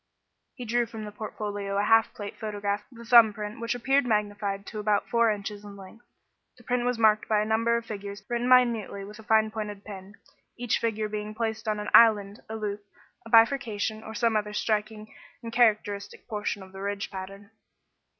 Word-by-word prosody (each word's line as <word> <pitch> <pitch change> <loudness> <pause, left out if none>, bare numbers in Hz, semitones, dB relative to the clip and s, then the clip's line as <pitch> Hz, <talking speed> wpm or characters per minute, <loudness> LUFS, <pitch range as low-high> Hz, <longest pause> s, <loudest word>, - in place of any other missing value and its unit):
He 245 - -7
drew 240 +1 +1
from 220 -2 -7
the 210 - -7
portfolio 205 -1 -4
a 200 - +2
half 225 +1 +4
plate 205 -1 -7
photograph 205 0 -3
of 240 - -16
the 235 - -11
thumb 230 -2 +7
print 210 +1 -6
which 230 +1 -2
appeared 270 +3 +2
magnified 205 -2 -1
to 215 - -7
about 210 -1 +1
four 235 -1 +3
inches 205 0 -4
in 200 -1 -10
length. 195 +5 -14 0.5
The 245 - -18
print 245 0 -1
was 245 -1 0
marked 215 -1 +3
by 215 -1 +3
a 210 - 0
number 230 +2 +2
of 235 - -5
figures 200 -2 -7
written 240 0 -1
minutely 235 -6 +3
with 210 +2 -11
a - - -11
fine 220 0 +3
pointed 210 -2 -6
pen, 200 -1 -10 0.4
each 240 -1 0
figure 220 -2 -1
being 210 0 -5
placed 220 -1 -3
on 210 -1 0
an 210 - -4
"island," 210 -3 +6
a 220 - -4
loop, 210 -1 -4 0.4
a - - -11
bifurcation 225 -2 +3
or 220 0 -9
some 230 -1 +1
other 210 0 -1
striking 215 0 -2 0.3
and 230 0 -7
characteristic 210 -4 +1
portion 210 -3 -3
of 190 - -14
the 195 0 -9
ridge 200 0 -3
pattern. 195 +2 -8
215 Hz, 200 wpm, -27 LUFS, 205-230 Hz, 0.5 s, thumb